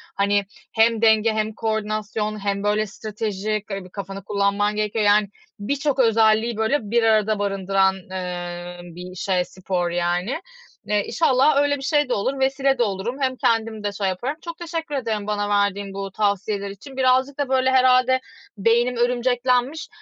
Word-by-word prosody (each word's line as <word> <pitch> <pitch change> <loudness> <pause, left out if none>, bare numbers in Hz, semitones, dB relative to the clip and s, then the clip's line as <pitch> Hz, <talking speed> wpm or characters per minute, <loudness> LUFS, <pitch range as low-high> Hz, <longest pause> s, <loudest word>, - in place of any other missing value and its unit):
hani, 200 0 +2 0.3
hem 225 0 +3
denge 220 0 +4
hem 215 0 -1
koordinasyon 215 -1 -2
hem, 200 0 -1
böyle, 210 +1 +1
stratejik, 215 0 -4
eee, 195 -1 -4
bir - - -13
kafanı 195 0 -7
kullanman 200 +1 0
gerekiyor. 215 0 0
Yani 205 0 +4 0.3
birçok 275 +5 -1
özelliği, 225 -1 +3
böyle, 220 +7 +1
bir 235 0 +3
arada 215 -1 +3
barındıran, 195 -1 +1 0.2
eee, 175 -1 -5
bir 180 +1 -10
şey, 185 -1 0
spor 180 -1 -3
yani. 175 - -1 0.4
Eee, 210 -1 +1
inşallah 275 -2 +3
öyle 285 0 +1
bir - - -10
şey 290 0 +1
de - - +1
olur, 265 +7 -1
vesile 270 0 +2
de 240 - +3
olurum. 205 +3 -2
Hem 260 -1 +1
kendimi 225 -3 0
de 205 - -1
şey 200 -1 -2
yaparım. 240 +11 -2
Çok 335 -1 -7
teşekkür 330 -3 -4
ederim 220 -6 -2
bana 205 -1 -1
verdiğin 200 -1 0
bu 195 0 -5
tavsiyeler 200 0 -1
için. 260 +8 -11
Birazcık 260 +2 +2
da, 280 -2 -1
böyle, 260 0 +2
herhâlde 255 0 +4 0.4
beynim 235 +4 +2
örümceklenmiş, 250 +3 +1
215 Hz, 160 wpm, -22 LUFS, 200-255 Hz, 0.4 s, denge